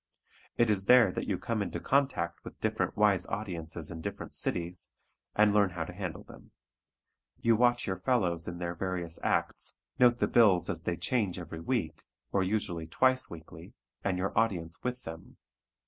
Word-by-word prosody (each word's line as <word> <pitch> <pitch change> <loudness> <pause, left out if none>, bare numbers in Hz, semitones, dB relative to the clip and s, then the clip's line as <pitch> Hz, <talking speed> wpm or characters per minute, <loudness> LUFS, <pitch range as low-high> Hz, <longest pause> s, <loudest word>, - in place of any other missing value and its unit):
It 120 -2 +4
is 95 -2 +1
there 125 +2 +7
that - - -4
you 95 - 0
come 115 +2 -2
in 100 - -1
contact 135 -12 0
with - - -10
different - - -1
wise 100 -4 +3
audiences 85 -6 -4
in 80 -1 -6
different - - -6
cities 90 0 -3 0.5
and 105 -1 +5
learn 100 -2 +4
how 90 -2 -3
to - - -8
handle 90 -3 -5
them. - - -15 0.9
You 115 -1 +4
watch 120 +1 +3
your 95 -1 -2
fellows 90 -8 +1
in 85 - -4
their 85 0 -3
various 85 -2 -3
acts, - - -1 0.2
note 120 -1 +6
the - - +1
bills 100 -7 +4
as - - -3
they 85 - -2
change 100 0 0
every 85 -2 -7
week, 80 -7 -2 0.3
or 100 - +2
usually 90 -4 -1
twice 130 +9 +2
weekly, 80 0 -11 0.3
and 95 -2 0
your 95 +2 -2
audience 90 -7 0
with 125 0 -3
them. 80 0 -9
95 Hz, 175 wpm, -30 LUFS, 85-115 Hz, 0.9 s, there